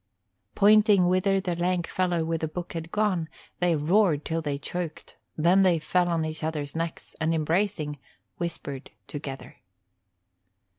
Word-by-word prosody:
Pointing 210 -2 +6
whither 185 +2 +2
the 180 -2 -2
lank 175 0 0
fellow 175 -3 0
with 165 0 -2
the 160 - 0
book 175 +3 -6
had 165 0 -6
gone, 190 -6 0 0.3
they 175 -2 +3
roared 160 0 +2
till 165 0 -1
they 145 -3 -2
choked; 170 +2 -6 0.2
then 175 +5 +4
they 185 -3 +4
fell 175 +3 +1
on 165 -2 0
each 155 0 -5
other's 150 -2 -3
necks, 165 0 -4
and 160 +1 +2
embracing, 160 -2 0 0.4
whispered 160 -5 -5 0.2
together. 140 0 -7
170 Hz, 145 wpm, -27 LUFS, 155-185 Hz, 0.4 s, Pointing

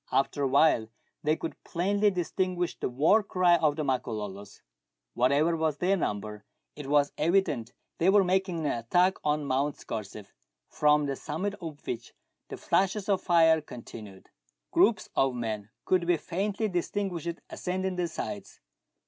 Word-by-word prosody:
After 140 +1 +1
a 140 - +2
while 135 -4 +4 0.3
they 155 +1 +2
could 165 - -7
plainly 200 +4 +1
distinguish 180 -1 -1
the - - -3
war 155 - +4
cry 180 -3 +3
of 155 -3 +2
the 155 - -2
Makololos. 105 -7 -4 0.5
Whatever 145 +7 +2
was 160 -2 0
their 180 +5 +2
number, 105 - -3 0.3
it 145 -2 -8
was 145 0 +2
evident 150 -8 +1 0.3
they 175 - +4
were 200 0 +6
making 185 -2 0
an - - +1
attack 175 +11 +2
on 150 0 0
Mount 140 +2 0
Scorze,, 105 -2 -7 0.4
from 150 0 +3
the 140 -1 -2
summit 165 +9 -3
of 160 -4 -8
which 120 -1 -5 0.3
the - - -7
flashes 195 +1 0
of 195 -2 +2
fire 160 -2 +4
continued 110 -8 -11 0.4
Groups - - +3
of 135 -2 +2
men 110 -3 -4 0.2
could 180 -2 +2
be 175 -1 +3
faintly 200 +7 -2
distinguished 175 -2 -2
ascending 185 +1 -2
the 180 -1 -1
sides. 200 +4 -6
160 Hz, 150 wpm, -28 LUFS, 130-185 Hz, 0.5 s, were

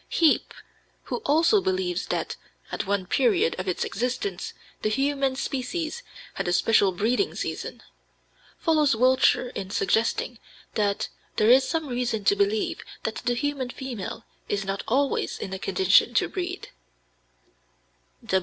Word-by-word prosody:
Heape, 325 -3 +2 0.5
who - - -3
also 330 +8 +4
believes 185 - -1
that - - -2 0.4
"at - - -3
one 200 -2 0
period 200 -6 +2
of 185 - -4
its 180 - 0
existence 250 - -2 0.3
the 215 - +1
human 275 +3 +1
species 310 - -3 0.3
had - - -3
a 175 - +1
special 200 +1 +4
breeding 230 - 0
season," - - -5 0.7
follows 305 -6 +3
Wiltshire 255 +1 +4
in 190 - -5
suggesting 225 +4 0 0.3
that 205 -2 0 0.3
"there 215 +2 +4
is 260 +1 +5
some 320 -2 -1
reason 245 -4 -1
to 200 - +4
believe 200 +2 0 0.2
that 220 - -2
the 245 0 -1
human 280 -1 -2
female 240 -5 -6 0.2
is 200 -1 -1
not 195 +1 -2
always 275 +4 +1
in 190 - -5
a 190 - -4
condition 380 - +3
to - - +3
breed." 365 -1 -5
245 Hz, 135 wpm, -26 LUFS, 200-280 Hz, 0.7 s, is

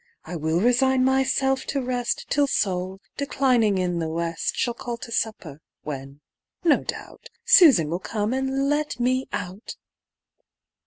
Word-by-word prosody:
I 180 - -6
will 160 +1 0
resign 255 +4 +3
myself 265 0 +1
to 280 - -2
rest 250 -1 -2
Till 285 0 +3
Sol, 190 -5 -1 0.2
declining 250 -7 +2
in 180 -2 -1
the 160 -1 -2
west, 165 0 -2
Shall 240 - 0
call 240 0 -6
to 230 - -9
supper, 180 -10 -3 0.2
when, 140 -1 -7 0.4
no 330 -4 +3
doubt, - - -8 0.2
Susan 275 - +7
will 170 +4 -2
come 210 +3 -2
and 265 +1 -1
let 295 -3 -1
me 255 +2 0
out." 185 +4 -6
235 Hz, 145 wpm, -24 LUFS, 180-265 Hz, 0.4 s, Susan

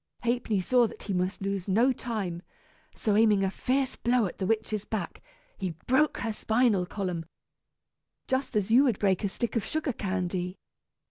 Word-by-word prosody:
Ha'penny 235 -3 +1
saw 245 +4 +4
that - - -11
he 200 - -3
must 185 +2 -1
lose 195 -1 -2
no 230 +7 +4
time, 205 -9 -4 0.5
so 210 -2 0
aiming 210 -2 +4
a 190 - +1
fierce 260 +5 0
blow 240 -1 +2
at 180 - -6
the 190 - -1
witch's 215 -1 0
back, 205 -7 -4 0.4
he 185 -5 -3
broke 295 +4 +3
her 225 -1 -1
spinal 220 -4 +2
column, 180 -4 -3 1.0
just 260 -2 -1
as 210 0 +1
you 250 +4 +7
would 235 -7 +2
break 195 -2 +1
a 200 - +1
stick 235 +5 -3
of 230 - +1
sugar 310 -4 -1
candy. 185 -2 -2
210 Hz, 175 wpm, -28 LUFS, 190-240 Hz, 1.0 s, you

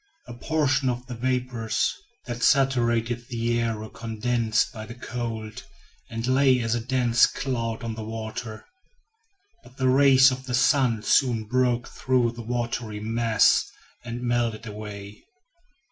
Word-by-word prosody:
A - - -8
portion 140 0 0
of 125 0 -3
the 125 - -7
vapors 125 -2 -1 0.3
that 120 0 -5
saturated 120 -4 +2
the 120 -1 -1
air 115 -1 -1
were 110 0 -7
condensed 115 0 -1
by 110 -1 -8
the 115 - -9
cold, 115 -3 -5 0.5
and 115 +1 -4
lay 130 0 +4
as 115 -1 -1
a 120 - 0
dense 120 -1 +3
cloud 115 -4 -3
on 115 -1 -3
the 110 0 -6
water. 110 0 -6 1.0
But 125 +2 -18
the 130 -1 +2
rays 135 0 +6
of 130 0 -6
the 125 - 0
sun 125 -3 +2
soon 120 -1 +2
broke 125 +1 0
through 125 -2 0
the 120 0 -9
watery 115 -2 -3
mass 115 0 +3 0.4
and 120 +1 -6
melted 120 -2 -1
it - - -6
away. 105 -1 -9
120 Hz, 145 wpm, -25 LUFS, 115-125 Hz, 1.0 s, rays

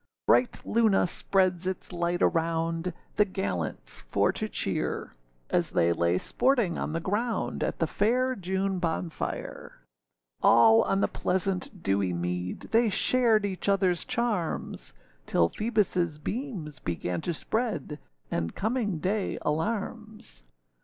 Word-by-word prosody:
Bright 250 - +3
Luna 220 -3 +3
spreads 185 0 +1
its 185 0 -4
light 175 0 0
around, 165 +1 0 0.3
The 210 - +7
gallants 95 - -4
for - - +1
to - - -4
cheer; - - -2 0.4
As - - +2
they 85 0 +2
lay 85 +1 +2
sporting 235 - +1
on - - -3
the 165 - 0
ground, 215 +7 -1
At - - -2
the 165 - +1
fair 250 +9 +1
June 190 0 -1
bonfire. 165 -1 -4 0.6
All 115 -1 +7
on 195 - +1
the - - +3
pleasant 185 0 -2
dewy 95 -2 +1
mead, 90 +1 -3
They 230 0 +4
shared 225 -1 +3
each 190 -1 -4
otherâs 190 -3 +2
charms; 230 - -2 0.3
Till 85 0 +3
Phoebusâ 185 -8 0
beams 210 - -4
began 90 0 -3
to - - -2
spread, 170 - -2 0.3
And 85 0 -2
coming 220 -3 -1
day 195 +5 -1
alarms. 215 - -3
185 Hz, 125 wpm, -28 LUFS, 155-215 Hz, 0.6 s, The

